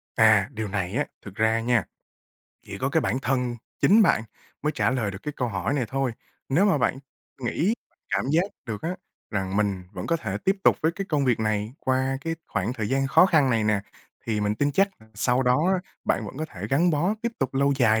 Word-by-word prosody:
À, 110 -4 +5
điều 110 0 -4
này 95 -2 -2
á, 145 +2 +1 0.2
thực 100 -2 -11
ra 110 +1 +2
nha, 115 -3 +2 0.8
chỉ 100 - -8
có 130 - 0
cái 160 +3 +2
bản 130 - 0
thân 125 -1 0 0.2
chính 220 +3 +6
bạn 170 - +3 0.4
mới 150 +1 +1
trả - - +1
lời 120 -6 0
được 95 +1 -9
cái 150 - -4
câu 125 - -1
hỏi 100 +5 -1
này 135 -4 +1
thôi. 135 -1 -1 0.4
Nếu 160 +9 +3
mà 190 -8 +3
bạn 135 - +1 0.4
nghĩ, 160 - +1 0.4
cảm - - +1
giác 170 +3 +4 0.2
được 110 -3 -5
á, 165 - -1 0.4
rằng 95 -2 -2
mình 100 -3 0
vẫn 90 -2 -5
có 165 - +2
thể 105 -11 -4
tiếp 195 +1 +3
tục - - +6
với 160 +1 +3
cái 195 +3 -4
công 145 -3 +1
việc 125 -4 +2
này 110 0 -1
qua 130 +1 +1
cái 165 +1 -2
khoảng 105 +3 -1
thời 110 -4 -3
gian 135 +1 +1
khó 140 +6 +6
khăn 155 -8 +3
này 115 -3 +2
nè, 105 -2 +2 0.5
thì 110 -2 0
mình 105 0 +1
tin 145 +6 0
chắc 195 +6 +4 0.3
sau 125 +5 +2
đó 130 +7 +3
á - - +1 0.3
bạn 110 - 0
vẫn 115 - -9
có 155 - -1
thể 100 - -7
gắn 170 +6 +4
bó 170 +7 +1
tiếp 235 0 -1
tục 135 -1 -1
lâu 140 +1 +3
dài 110 -4 +4
125 Hz, 230 wpm, -25 LUFS, 105-145 Hz, 0.8 s, chính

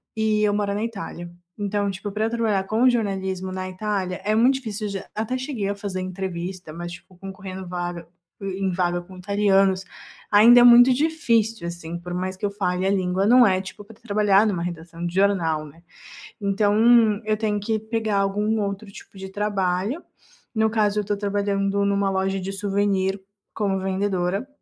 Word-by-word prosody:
e 215 -1 +1
eu 205 -1 +2
moro 205 -1 0
na 210 - -2
Itália. 200 -6 -6 0.3
Então, 205 0 -1
tipo, 195 +2 -6
pra 215 +2 -1
eu 225 - 0
trabalhar 225 -4 0
com 230 +5 +3
jornalismo 190 -5 -2
na 185 0 -4
Itália 185 -1 -3
é 210 - +1
muito 250 +4 +4
difícil 220 -5 -4
já 195 -1 -5
até 225 +4 -2
cheguei 255 -7 -3
a 200 - -2
fazer 200 -2 -5
entrevista, 185 -2 -5
mas, 175 +1 -6
tipo, 180 +1 -14
concorrendo 190 -1 -8
vaga 175 -2 -5 0.3
e 195 0 -4
em 190 - +1
vaga 175 -1 0
com 185 +1 -14
italianos 195 -1 +2 0.5
ainda 235 +4 +8
é - - +7
muito 245 +1 +8
difícil, 230 - 0
assim. 170 0 -6
Por 175 0 -7
mais 185 +1 -3
que 205 - -3
eu 200 - -1
fale 180 -2 -1
a - - +2
língua, 190 0 0
não 245 +1 +7
é, 185 -2 +3
tipo, 195 +2 -10
pra 210 +1 -15
trabalhar 210 -1 +3
numa 180 -5 -1
redação 170 0 -6
de 175 - -4
jornal, 170 -6 +1
né. 165 +4 -16 0.6
Então 210 +2 +4
eu 215 0 +1
tenho 210 -2 -1
que 220 +1 -1
pegar 220 -1 -1
algum 210 +2 0
outro 200 +1 -4
tipo 195 - -14
de 190 0 -7
trabalho, 200 - -1 0.5
no 220 0 +3
caso 210 -1 +1
eu - - +2
estou 205 0 -2
trabalhando 200 0 0
numa 200 0 +1
loja 195 0 0
de 190 +1 -4
souvenir 195 -1 0 0.4
como 195 -3 0
vendedora 190 +2 -1
200 Hz, 185 wpm, -23 LUFS, 185-215 Hz, 0.6 s, ainda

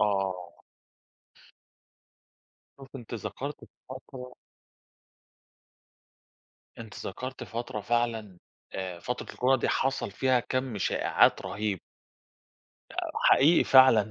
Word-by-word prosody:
آه. 95 -4 -1 2.3
شُفتِ 135 0 -11
أنتِ 120 -1 -8
ذكرتِ 115 +7 -6 0.2
فترة 130 -1 -9 2.4
أنتِ 110 -2 -9
ذكرتِ 130 +7 -6
فترة 120 -1 -5
فعلًا، 115 -5 -1 0.3
آآ 95 -2 -5
فترة 125 +7 -5
الكورونا 130 0 +2
دي - - 0
حصَل 135 -5 0
فيها 130 +4 +2
كم 130 -3 -3
شائعات - - +2
رهيب. 100 -2 -2 1.1
آآ - - -3
حقيقي 160 +5 +5
فعلًا 120 -6 +6
120 Hz, 90 wpm, -28 LUFS, 100-130 Hz, 2.4 s, فعلًا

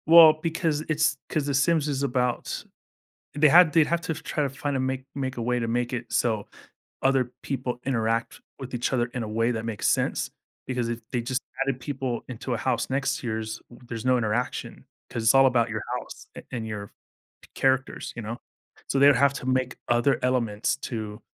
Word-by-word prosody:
Well, 165 -1 +10
because 165 -2 0
it's 155 -1 +2
'cause 150 -2 0
the 145 - -1
Sims 150 +2 +3
is 140 -1 -1
about 125 -2 -1 0.7
they 150 +1 +5
had 165 +1 +7
they 160 -2 +6
have 170 +2 0
to 160 - -2
try 155 -1 -3
to 140 - +1
find 140 +1 -3
a - - 0
make 130 0 -2
make 135 -2 -3
a 120 - -3
way 125 +1 +1
to 115 -1 -2
make 120 +2 -1
it 120 -1 -4
so 110 -4 +1 0.6
other 130 -2 +2
people 130 -3 -3
interact 115 -3 -1 0.2
with 130 -1 -8
each 120 +2 -1
other 120 -2 +2
in 125 - -2
a - - -4
way 115 +2 +1
that 115 -1 -3
makes 110 -3 -2
sense, - - +1 0.4
because 125 -2 -1
if 120 0 -3
they, 120 - 0
just, 125 +2 -2 0.3
added 135 -2 0
people 130 -2 -3
into 125 +1 -4
a - - 0
house 120 +2 -1
next 135 +2 0
yours, 110 -3 -3
there's 120 -1 -8
no 130 0 +4
interaction, 120 +2 -2 0.2
'cause 115 - -3
it's 115 - +5
all 135 0 +7
about 120 -3 +3
your 105 -2 -3 0.2
house - - -10
a - - -8
and 115 -3 -3
your 105 -2 -5 0.5
c - - -17
characters, 130 0 0
you 115 - -5
know, 115 +2 -5 0.5
so - - 0
they 140 - +8
would 145 - +7
have 140 +1 +4
to 135 - -7
make 130 0 +1
other 120 +3 +3
elements 115 -4 +1
to 110 -2 -5
125 Hz, 205 wpm, -26 LUFS, 115-140 Hz, 0.7 s, Well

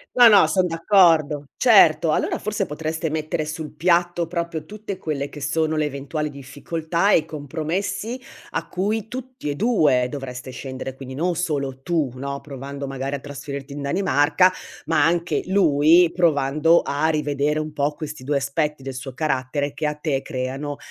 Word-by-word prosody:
No, 245 -1 +9
no, 205 -2 +7
son 185 -2 +2
d'accordo, 165 -5 +3
certo. 175 -9 +5
Allora - - 0
forse 210 -2 -2
potreste 160 +2 -3
mettere 155 0 -2
sul 155 0 -6
piatto 175 0 +2
proprio 170 -2 -3
tutte 210 -2 -7
quelle 145 -3 -3
che 145 - -11
sono 160 +2 0
le 155 - +1
eventuali 150 +2 -3
difficoltà 160 +7 -2
e - - +7
i 155 - -1
compromessi, 180 - -4 0.3
a - - -3
cui 210 +3 -2
tutti 255 - -6
e 145 - -2
2 150 - +3
dovreste 130 -2 -7
scendere, 130 0 -6
quindi 130 -1 -9
non 175 +3 0
solo 140 -6 -2
tu, 160 -5 0
no, 140 +1 -4
provando 140 0 -7
magari 135 +1 -3
a - - -5
trasferirti 140 0 -7
in 145 - -6
Danimarca, 155 +2 +3 0.4
ma 155 -2 +2
anche 170 +2 +1
lui, 170 -2 +5
provando 155 -1 +3
a 145 +3 0
rivedere 150 0 0
un 155 0 -5
po' 145 0 0
questi 150 -3 -7
2 140 +1 0
aspetti 150 +1 -1
del 135 0 -5
suo 130 0 -7
carattere 145 -1 -1
che 150 +1 -2
a 150 - -2
te 150 -3 -1
creano, 135 +3 -4
150 Hz, 165 wpm, -22 LUFS, 140-170 Hz, 0.4 s, No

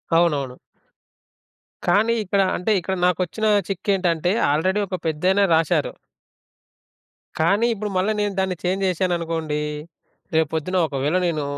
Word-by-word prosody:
అవునవును. 145 -7 +1 1.3
కానీ, 210 +6 +3
ఇక్కడ 200 0 +1 0.2
అంటే 180 +5 -1
ఇక్కడ 190 +2 -3
నాకొచ్చిన 180 +4 0 0.2
చిక్కేంటంటే, 180 -3 0 0.2
ఆల్రెడీ 185 +7 +1
ఒక 185 - -3
పెద్దాయన 180 +6 +1
రాసారు. 160 -2 +1 1.5
కానీ 200 +8 +3
ఇప్పుడు 210 -1 -4
మళ్ళ 185 +3 +1
నేను 205 -1 -1
దాన్ని 190 -1 0
చేంజ్ 190 +2 0
జేశాననుకోండీ, 165 -4 -1 0.7
రేపొద్దున 160 +3 0
ఒకవేళ 145 +4 -1
నేను 160 -4 -1
180 Hz, 110 wpm, -22 LUFS, 160-190 Hz, 1.5 s, కానీ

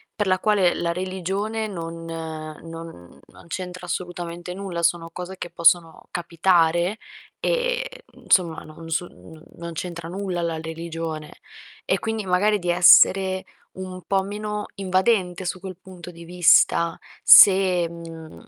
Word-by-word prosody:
per 210 -2 -1
la 185 -1 +2
quale 200 -4 +2
la 170 0 -1
religione 190 +4 -3
non 165 -3 -7
non 160 - -8
non - - -18
c'entra 180 +1 -6
assolutamente 175 0 -5
nulla. 185 -3 -5
Sono 165 0 +1
cose 180 +2 -7
che - - -6
possono 170 -1 +2
capitare, 175 +2 +1 0.4
e, - - -2
mhmm, - - -18
insomma 170 -4 +2
non 165 +1 -12
su 175 +2 -1
non 160 0 -16
non 170 0 -7
c'entra 170 0 -6
nulla 185 -2 -3
la 165 -1 -2
religione. 160 -1 -6 0.5
E - - +1
quindi, 225 -2 -3
magari, 205 +3 +2
di 175 - -4
essere 185 +2 +5 0.3
un 185 -1 -7
po' 195 +1 +1
meno 210 +1 -5
invadente 185 -1 0
su 180 +1 -3
quel 185 -2 -8
punto 180 -2 -11
di 170 0 -13
vista 170 -1 +3 0.2
se, 185 -3 +7
mhmm, 165 -1 -11
175 Hz, 140 wpm, -23 LUFS, 165-190 Hz, 0.5 s, se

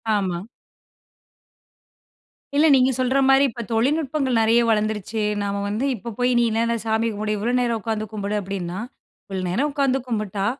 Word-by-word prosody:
ஆமா. 185 -1 -2 2.1
இல்லை 300 +3 +5
நீங்க 260 0 +4
சொல்ற 255 +1 +1
மாரி 270 +1 +6
இப்போ 235 - -7
தொழில்நுட்பங்கள் 270 +1 +1
நெறைய 225 +2 +4
வளர்ந்துருச்சு. 215 0 0 0.2
நாம 200 0 -2
வந்து 215 +6 -1
இப்போ 235 +2 -7
போயி, 250 0 +2
"நீ 240 - +4
என்னான்ன, 230 +1 +1
சாமி 225 0 0
கும்பிடு! 210 +1 -2
இவ்வளோ 235 +4 -1
நேரம் 235 -2 0
உக்காந்து 220 0 -2
கும்பிடு"அப்படின்னா, 200 -4 -3 0.5
"இவ்வளோ 190 -2 -4
நேரம் 260 +12 0
உக்காந்து 275 -2 +1
கும்பிட்டா, 210 -4 -2
225 Hz, 140 wpm, -22 LUFS, 205-255 Hz, 2.1 s, மாரி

